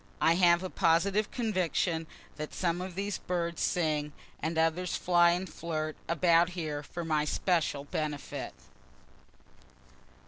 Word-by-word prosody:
(I 165 Hz, -, +4 dB
have 175 Hz, 0 st, +4 dB
a 185 Hz, -, -3 dB
positive 195 Hz, +4 st, +2 dB
conviction 180 Hz, -7 st, 0 dB, 0.3 s
that 155 Hz, 0 st, -6 dB
some 175 Hz, -1 st, 0 dB
of 185 Hz, -1 st, -6 dB
these 200 Hz, 0 st, -2 dB
birds 170 Hz, -1 st, -2 dB
sing, 150 Hz, -4 st, 0 dB, 0.3 s
and 160 Hz, +1 st, -2 dB
others 165 Hz, +3 st, +1 dB
fly 175 Hz, -1 st, +4 dB
and 180 Hz, +2 st, -2 dB
flirt 155 Hz, -2 st, -4 dB
about 170 Hz, 0 st, +4 dB
here 150 Hz, -3 st, -3 dB
for 170 Hz, +3 st, -6 dB
my 155 Hz, -2 st, +1 dB
special 155 Hz, -2 st, 0 dB
benefit.) 145 Hz, -1 st, -4 dB
170 Hz, 130 wpm, -30 LUFS, 155-180 Hz, 0.3 s, I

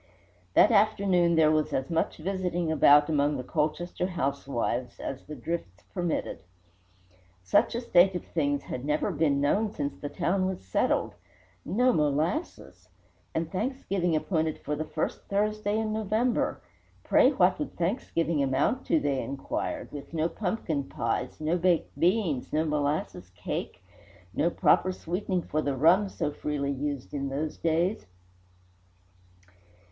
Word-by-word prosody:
That -, -, +6 dB
afternoon 200 Hz, -5 st, +3 dB
there 155 Hz, -1 st, +5 dB
was 155 Hz, -1 st, +1 dB
as 135 Hz, +4 st, -2 dB
much 165 Hz, -, 0 dB
visiting 175 Hz, -1 st, -2 dB
about 145 Hz, -1 st, +6 dB
among 145 Hz, -1 st, +1 dB
the 125 Hz, -, -4 dB
Colchester 160 Hz, +6 st, -1 dB
housewives 135 Hz, -7 st, -2 dB
as 135 Hz, -, -6 dB
the 150 Hz, -, -6 dB
drifts 120 Hz, -, -5 dB
permitted. 175 Hz, -3 st, -2 dB, 1.0 s
Such 90 Hz, -, +2 dB
a 235 Hz, -, -1 dB
state 185 Hz, -5 st, +4 dB
of 180 Hz, -, -4 dB
things 145 Hz, -3 st, -1 dB
had 125 Hz, -, -6 dB
never 150 Hz, +1 st, 0 dB
been 145 Hz, -3 st, +1 dB
known 200 Hz, +9 st, +1 dB
since 145 Hz, -7 st, -3 dB
the 145 Hz, -, -6 dB
town 185 Hz, +4 st, 0 dB
was 185 Hz, -, -5 dB
settled. 95 Hz, -, 0 dB, 0.5 s
No 245 Hz, +8 st, +2 dB
molasses! 155 Hz, -, -1 dB, 0.5 s
And 165 Hz, 0 st, -1 dB
Thanksgiving 195 Hz, -5 st, -1 dB
appointed 155 Hz, -1 st, 0 dB
for 150 Hz, -, -3 dB
the 155 Hz, +2 st, -3 dB
first 155 Hz, -, -3 dB
Thursday 210 Hz, +1 st, 0 dB
in 220 Hz, -1 st, -1 dB
November! 220 Hz, +3 st, 0 dB, 0.4 s
Pray -, -, +5 dB
what -, -, +3 dB
would 300 Hz, -, -5 dB
Thanksgiving 170 Hz, -, 0 dB
amount 140 Hz, -, 0 dB
to, 325 Hz, -, +3 dB
they 135 Hz, -, 0 dB
inquired, 135 Hz, 0 st, -4 dB
with 145 Hz, +3 st, -8 dB
no 160 Hz, 0 st, +2 dB
pumpkin 175 Hz, -7 st, -2 dB
pies, 120 Hz, +1 st, -3 dB
no 160 Hz, +3 st, 0 dB
baked 175 Hz, -1 st, +1 dB
beans, 175 Hz, -, +1 dB
no 155 Hz, +1 st, +1 dB
molasses 145 Hz, -, -2 dB
cake, -, -, -5 dB, 0.5 s
no 170 Hz, -, +2 dB
proper 185 Hz, +1 st, +3 dB
sweetening 180 Hz, +1 st, -2 dB
for 155 Hz, -, -1 dB
the 140 Hz, -2 st, -1 dB
rum 180 Hz, +8 st, +4 dB
so 150 Hz, -, -2 dB
freely 145 Hz, -1 st, -2 dB
used 140 Hz, -1 st, -4 dB
in 140 Hz, -1 st, -2 dB
those 150 Hz, +3 st, -3 dB
days? 170 Hz, -, 0 dB
160 Hz, 140 wpm, -28 LUFS, 145-185 Hz, 1.0 s, That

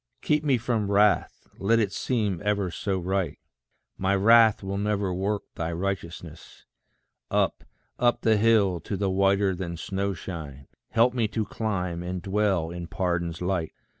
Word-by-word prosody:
Keep 150 Hz, 0 st, +2 dB
me 140 Hz, -4 st, +3 dB
from 110 Hz, -3 st, -1 dB
wrath, 105 Hz, 0 st, +2 dB
let 110 Hz, +4 st, +3 dB
it 105 Hz, -4 st, +1 dB
seem 105 Hz, -7 st, -1 dB
ever 100 Hz, -3 st, 0 dB
so 95 Hz, +2 st, -2 dB
right: 95 Hz, -3 st, -1 dB, 0.6 s
My 95 Hz, +1 st, +2 dB
wrath 110 Hz, +1 st, +5 dB
will 100 Hz, +1 st, -3 dB
never 100 Hz, -2 st, 0 dB
work 100 Hz, +3 st, -1 dB
thy 80 Hz, 0 st, -3 dB
righteousness. 85 Hz, -3 st, -6 dB, 0.6 s
Up, -, -, 0 dB, 0.4 s
up 120 Hz, 0 st, +2 dB
the 110 Hz, -1 st, +3 dB
hill, 105 Hz, -5 st, +3 dB
to 100 Hz, -, -4 dB
the 95 Hz, 0 st, 0 dB
whiter 95 Hz, 0 st, +2 dB
than 85 Hz, -2 st, -5 dB
snow 100 Hz, +3 st, -2 dB
shine, 75 Hz, -7 st, -8 dB, 0.2 s
Help 115 Hz, +2 st, +3 dB
me 120 Hz, -3 st, +1 dB
to 110 Hz, 0 st, -2 dB
climb, 90 Hz, -7 st, -3 dB
and 90 Hz, +1 st, -4 dB
dwell 95 Hz, -3 st, 0 dB
in 85 Hz, -1 st, -6 dB
pardon's 85 Hz, -1 st, -2 dB
light. 90 Hz, -3 st, -1 dB
95 Hz, 155 wpm, -26 LUFS, 90-105 Hz, 0.6 s, wrath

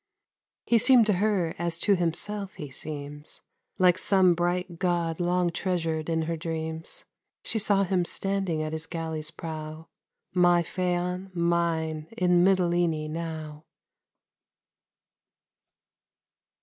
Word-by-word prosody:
He 235 Hz, -, +4 dB
seemed 245 Hz, 0 st, +6 dB
to 210 Hz, -, +2 dB
her, 195 Hz, -6 st, +1 dB
as 170 Hz, -1 st, -1 dB
to 205 Hz, -, +4 dB
himself 190 Hz, +3 st, -2 dB
he 145 Hz, -3 st, -8 dB
seems, 145 Hz, +1 st, -8 dB, 0.4 s
Like 185 Hz, -1 st, +4 dB
some 185 Hz, -2 st, +4 dB
bright 175 Hz, 0 st, -2 dB
God 170 Hz, -3 st, 0 dB
long 175 Hz, 0 st, +1 dB
treasured 165 Hz, -3 st, -2 dB
in 160 Hz, -1 st, 0 dB
her 165 Hz, +1 st, -2 dB
dreams; 160 Hz, 0 st, -5 dB, 0.4 s
She 225 Hz, -, 0 dB
saw 200 Hz, -1 st, +3 dB
him 185 Hz, -1 st, +1 dB
standing 190 Hz, -3 st, 0 dB
at 155 Hz, 0 st, -4 dB
his 160 Hz, 0 st, -4 dB
galley's 160 Hz, -2 st, -4 dB
prow 160 Hz, 0 st, -7 dB, 0.4 s
My 175 Hz, -1 st, +4 dB
Phaon, 180 Hz, +1 st, -2 dB
mine, 165 Hz, -2 st, 0 dB
in 180 Hz, -1 st, +4 dB
Mitylene 175 Hz, -4 st, +2 dB
now! 160 Hz, -2 st, -6 dB
170 Hz, 115 wpm, -27 LUFS, 160-185 Hz, 0.4 s, seemed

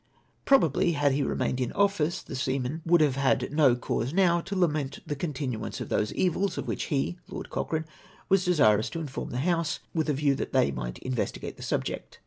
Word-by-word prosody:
Probably 170 Hz, -, +4 dB
had 145 Hz, -2 st, +2 dB
he 140 Hz, +2 st, +1 dB
remained 130 Hz, -1 st, -1 dB
in 125 Hz, -, -1 dB
office 195 Hz, -5 st, +1 dB
the -, -, -7 dB
seamen 130 Hz, +3 st, -2 dB
would 170 Hz, -1 st, +5 dB
have 140 Hz, -3 st, +2 dB
had 135 Hz, +1 st, +1 dB
no 145 Hz, -5 st, +5 dB
cause 125 Hz, +2 st, -2 dB
now 175 Hz, -2 st, +3 dB
to 195 Hz, +4 st, -5 dB
lament 150 Hz, -6 st, 0 dB
the 150 Hz, -, -3 dB
continuance 140 Hz, -6 st, -4 dB
of -, -, -5 dB
those 105 Hz, -, 0 dB
evils 190 Hz, +2 st, 0 dB
of -, -, -3 dB
which -, -, -2 dB
he 155 Hz, +4 st, -1 dB
(Lord -, -, -7 dB
Cochrane) 160 Hz, -1 st, -2 dB, 0.4 s
was 195 Hz, -1 st, +3 dB
desirous 135 Hz, -, +3 dB
to 165 Hz, -, -5 dB
inform 145 Hz, -5 st, -5 dB
the 125 Hz, -, -2 dB
House, 170 Hz, -3 st, +1 dB, 0.2 s
with 160 Hz, -2 st, 0 dB
a -, -, +3 dB
view 140 Hz, 0 st, +2 dB
that -, -, -4 dB
they 70 Hz, -, +3 dB
might -, -, -5 dB
investigate 130 Hz, -3 st, -3 dB
the -, -, -14 dB
subject. -, -, -3 dB
150 Hz, 200 wpm, -28 LUFS, 130-170 Hz, 0.4 s, would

